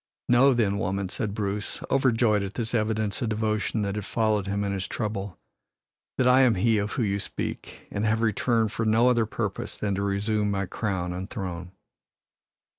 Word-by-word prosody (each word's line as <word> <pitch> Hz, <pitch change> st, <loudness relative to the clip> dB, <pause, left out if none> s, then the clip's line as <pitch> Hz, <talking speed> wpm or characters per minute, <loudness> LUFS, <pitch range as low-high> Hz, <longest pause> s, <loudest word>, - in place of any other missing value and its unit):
"Know, 125 Hz, +2 st, +5 dB
then, 100 Hz, -4 st, +1 dB
woman," 95 Hz, -1 st, -1 dB
said 100 Hz, +1 st, -3 dB
Bruce, 105 Hz, -1 st, -3 dB
overjoyed 120 Hz, -5 st, +3 dB
at 100 Hz, 0 st, -5 dB
this 115 Hz, -1 st, -3 dB
evidence 110 Hz, -2 st, 0 dB
of 120 Hz, -, 0 dB
devotion 110 Hz, 0 st, 0 dB
that 100 Hz, -1 st, -1 dB
had 105 Hz, 0 st, -3 dB
followed 105 Hz, -1 st, 0 dB
him 100 Hz, +1 st, -1 dB
in 100 Hz, -, -1 dB
his 95 Hz, -2 st, -3 dB
trouble, 105 Hz, -4 st, -4 dB, 0.8 s
"that 130 Hz, -, +3 dB
I 125 Hz, +1 st, +6 dB
am 125 Hz, -4 st, +5 dB
he 110 Hz, +3 st, +2 dB
of 105 Hz, 0 st, -2 dB
whom 120 Hz, -, 0 dB
you 100 Hz, 0 st, 0 dB
speak 95 Hz, -, -6 dB
and 100 Hz, -, -2 dB
have 110 Hz, +1 st, +1 dB
returned 115 Hz, 0 st, +1 dB
for 115 Hz, -, -2 dB
no 115 Hz, +3 st, +4 dB
other 120 Hz, -3 st, +2 dB
purpose 105 Hz, -3 st, -3 dB
than 100 Hz, -2 st, -1 dB
to 100 Hz, -, -1 dB
resume 105 Hz, +1 st, 0 dB
my 100 Hz, -1 st, -1 dB
crown 95 Hz, -3 st, -2 dB
and 95 Hz, +2 st, -5 dB
throne." 90 Hz, -3 st, -5 dB
105 Hz, 190 wpm, -26 LUFS, 100-115 Hz, 0.8 s, I